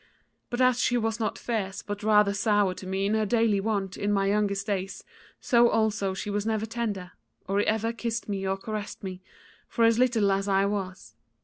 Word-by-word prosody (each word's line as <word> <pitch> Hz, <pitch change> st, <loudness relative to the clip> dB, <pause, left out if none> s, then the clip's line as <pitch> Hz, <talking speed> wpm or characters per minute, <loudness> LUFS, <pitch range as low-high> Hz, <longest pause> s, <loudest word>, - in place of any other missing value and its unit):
But 240 Hz, +1 st, -2 dB
as 255 Hz, -1 st, +4 dB
she 245 Hz, -, +2 dB
was 225 Hz, 0 st, -1 dB
not 220 Hz, -, -1 dB
fierce 205 Hz, -5 st, -3 dB
but 205 Hz, 0 st, -5 dB
rather 210 Hz, -1 st, +4 dB
sour 205 Hz, -2 st, +2 dB
to 185 Hz, +1 st, -9 dB
me 190 Hz, +1 st, -1 dB
in 205 Hz, -, +1 dB
her 220 Hz, 0 st, +2 dB
daily 225 Hz, -2 st, +2 dB
wont 200 Hz, -2 st, -2 dB
in 205 Hz, +1 st, -1 dB
my 195 Hz, -1 st, +2 dB
youngest 200 Hz, -1 st, 0 dB
days 195 Hz, -2 st, -3 dB, 0.4 s
so 240 Hz, -2 st, +4 dB
also 210 Hz, -3 st, 0 dB
she 205 Hz, +1 st, -4 dB
was 205 Hz, 0 st, -1 dB
never 220 Hz, 0 st, -1 dB
tender, 215 Hz, -5 st, -4 dB, 0.4 s
or 195 Hz, +1 st, +1 dB
ever 220 Hz, +2 st, 0 dB
kissed 230 Hz, 0 st, -3 dB
me 195 Hz, -2 st, -2 dB
or 190 Hz, 0 st, 0 dB
caressed 210 Hz, +1 st, -6 dB
me, 185 Hz, -1 st, -6 dB, 0.5 s
for 230 Hz, -, +2 dB
as 230 Hz, 0 st, +4 dB
little 230 Hz, -6 st, +3 dB
as 195 Hz, +1 st, 0 dB
I 195 Hz, 0 st, +3 dB
was. 190 Hz, -, -4 dB
205 Hz, 200 wpm, -27 LUFS, 195-225 Hz, 0.5 s, as